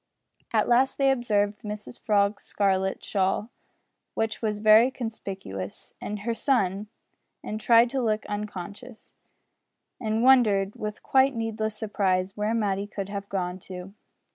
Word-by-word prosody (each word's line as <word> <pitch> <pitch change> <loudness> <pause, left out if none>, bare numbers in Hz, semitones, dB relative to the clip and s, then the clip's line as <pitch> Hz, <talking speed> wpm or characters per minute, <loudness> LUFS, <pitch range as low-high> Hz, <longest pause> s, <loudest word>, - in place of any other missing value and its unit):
At - - +2
last 250 +2 +3
they 275 -1 +4
observed 210 -5 0
Mrs 210 +2 -7
Frog's 205 -1 +1
scarlet 190 -1 0
shawl 195 +3 0 0.6
which 225 -1 -1
was 215 -2 -1
very 215 +3 +6
conspicuous 195 - -6
and 210 -1 -5
her 230 +3 -1
son, 210 -5 0 0.6
and 215 +1 -5
tried 235 +1 +5
to 270 -1 0
look 215 -2 0
unconscious, 205 +3 -7 0.9
and 220 -1 -1
wondered 210 -7 +4
with 210 0 -6
quite 265 0 +3
needless 220 -1 -2
surprise 195 -3 0
where 210 +2 0
Matty 200 -2 0
could 200 -1 -5
have 200 -1 -5
gone 180 -1 -2
to. 185 +1 -8
210 Hz, 135 wpm, -26 LUFS, 195-230 Hz, 0.9 s, very